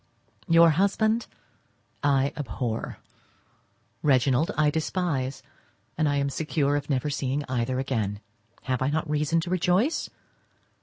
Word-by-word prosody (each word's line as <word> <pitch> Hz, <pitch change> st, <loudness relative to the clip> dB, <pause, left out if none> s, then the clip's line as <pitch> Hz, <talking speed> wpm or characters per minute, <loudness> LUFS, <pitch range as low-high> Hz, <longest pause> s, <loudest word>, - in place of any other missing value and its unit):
Your 165 Hz, -1 st, +6 dB
husband 215 Hz, +6 st, +1 dB, 0.7 s
I 140 Hz, -1 st, +2 dB
abhor, 115 Hz, -3 st, -4 dB, 1.0 s
Reginald 135 Hz, +1 st, +3 dB
I 150 Hz, -1 st, +3 dB
despise, 150 Hz, -4 st, -2 dB, 0.5 s
and 155 Hz, 0 st, +1 dB
I 145 Hz, -, +1 dB
am 140 Hz, 0 st, 0 dB
secure 150 Hz, -1 st, 0 dB
of 145 Hz, 0 st, -3 dB
never 140 Hz, +1 st, 0 dB
seeing 140 Hz, +1 st, -1 dB
either 130 Hz, 0 st, -1 dB
again. 110 Hz, -7 st, -2 dB, 0.4 s
Have 130 Hz, -2 st, -1 dB
I 130 Hz, -, +2 dB
not 155 Hz, +2 st, -1 dB
reason 150 Hz, +2 st, +1 dB
to 175 Hz, +1 st, -5 dB
rejoice? 185 Hz, -, +1 dB
145 Hz, 120 wpm, -26 LUFS, 130-165 Hz, 1.0 s, Your